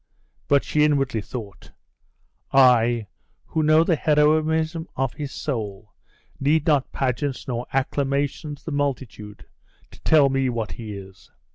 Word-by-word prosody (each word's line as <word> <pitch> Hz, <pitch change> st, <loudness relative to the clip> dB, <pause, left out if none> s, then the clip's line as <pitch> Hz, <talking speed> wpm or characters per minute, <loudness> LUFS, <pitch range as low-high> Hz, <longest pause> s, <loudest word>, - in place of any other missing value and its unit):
But 140 Hz, -1 st, +3 dB
she 150 Hz, -, +1 dB
inwardly 135 Hz, -6 st, +1 dB
thought, 105 Hz, -3 st, -9 dB, 0.8 s
"I, 120 Hz, -4 st, +4 dB, 0.4 s
who 160 Hz, -, -1 dB
know 155 Hz, +1 st, +5 dB
the 165 Hz, 0 st, +2 dB
heroism 155 Hz, +3 st, +2 dB
of 135 Hz, -1 st, -1 dB
his 145 Hz, -2 st, -6 dB
soul, 105 Hz, -7 st, -5 dB, 0.5 s
need 150 Hz, +2 st, +2 dB
not 145 Hz, -5 st, +2 dB
pageants 130 Hz, +1 st, -2 dB
nor 120 Hz, -1 st, -3 dB
acclamations 140 Hz, +2 st, -1 dB
of -, -, -30 dB
the 165 Hz, -, -4 dB
multitude 130 Hz, -7 st, -4 dB, 0.5 s
to -, -, -16 dB
tell 150 Hz, -3 st, +5 dB
me 135 Hz, -1 st, +1 dB
what 115 Hz, -3 st, -3 dB
he 110 Hz, -3 st, -7 dB
is. 95 Hz, 0 st, -13 dB
135 Hz, 135 wpm, -23 LUFS, 120-150 Hz, 0.8 s, know